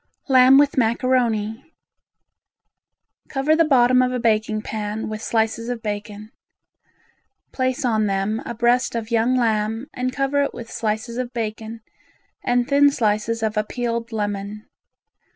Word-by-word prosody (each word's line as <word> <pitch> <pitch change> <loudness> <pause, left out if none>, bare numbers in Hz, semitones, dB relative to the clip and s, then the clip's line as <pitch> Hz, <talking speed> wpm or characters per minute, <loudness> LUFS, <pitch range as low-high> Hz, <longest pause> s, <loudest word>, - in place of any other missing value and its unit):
Lamb 260 0 +6
with 285 -1 +3
Macaroni 235 +1 0 1.5
Cover 285 +3 +1
the 330 - +4
bottom 255 -4 +4
of 250 0 +1
a 250 - -1
baking 215 -2 0
pan 215 0 -4
with 215 0 -5
slices 225 +1 -1
of 245 -2 -4
bacon. 210 0 -6 1.2
Place 260 +1 -1
on 220 -3 +1
them 195 +3 -1
a 235 - -6
breast 240 +2 +1
of 230 0 -4
young 235 +2 +2
lamb 225 0 0
and 255 0 -2
cover 275 +1 0
it 280 - -2
with 230 -1 -9
slices 220 +2 -3
of 250 -1 -3
bacon 225 -1 -5 0.6
and 245 0 +1
thin 285 0 +5
slices 225 -2 -1
of 215 0 -1
a 215 - +2
peeled 235 +1 -3
lemon. 205 0 -4
230 Hz, 140 wpm, -22 LUFS, 215-255 Hz, 1.5 s, Lamb